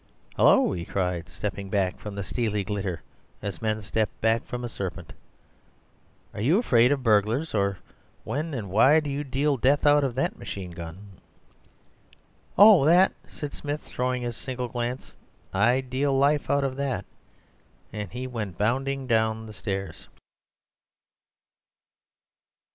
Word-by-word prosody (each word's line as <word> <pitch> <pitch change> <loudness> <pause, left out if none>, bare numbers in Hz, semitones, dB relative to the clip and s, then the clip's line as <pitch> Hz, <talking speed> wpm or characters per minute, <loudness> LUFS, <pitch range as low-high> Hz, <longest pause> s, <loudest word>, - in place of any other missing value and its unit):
"Hullo!" - - +5
he 85 -2 -3
cried, 90 -2 -2
stepping 100 +1 -5
back 95 -2 0
from 105 -1 -7
the 100 - -3
steely 105 -1 -1
glitter 95 -3 -3 0.4
as 100 -4 -5
men 110 -1 -1
step 105 0 0
back 115 +1 +2
from 125 -1 -5
a - - -2
serpent; 95 -6 -6 1.2
"are - - -5
you 150 - +3
afraid 125 - +4
of 140 -2 0
burglars? 110 +7 +2
or 100 -2 +1 0.5
when 155 +3 -3
and 105 -7 -5
why 135 +10 +6
do 150 -2 -4
you 140 +1 -2
deal 140 +1 0
death 140 +5 +2
out 145 0 +5
of 130 -3 -1
that 135 - -1
machine 95 -3 -6
gun?" 90 +3 -10 1.4
"Oh, 205 -6 +8
that!" 175 +6 +5 0.2
said 145 -1 -7
Smith, 145 +1 -4
throwing 125 0 -2
it 120 - -1
a - - -6
single 125 0 -5
glance; 120 +1 -4 0.4
"I 120 +7 +3
deal 135 +2 0
life 145 +1 +2
out 140 0 +2
of 135 -1 -2
that," 140 -2 -2 0.9
and 105 -3 -5
he 125 +2 -5
went 110 -8 -5
bounding 135 +5 0
down 110 -2 +1
the 110 - -10
stairs. 95 -4 -5
120 Hz, 150 wpm, -26 LUFS, 100-135 Hz, 1.4 s, Oh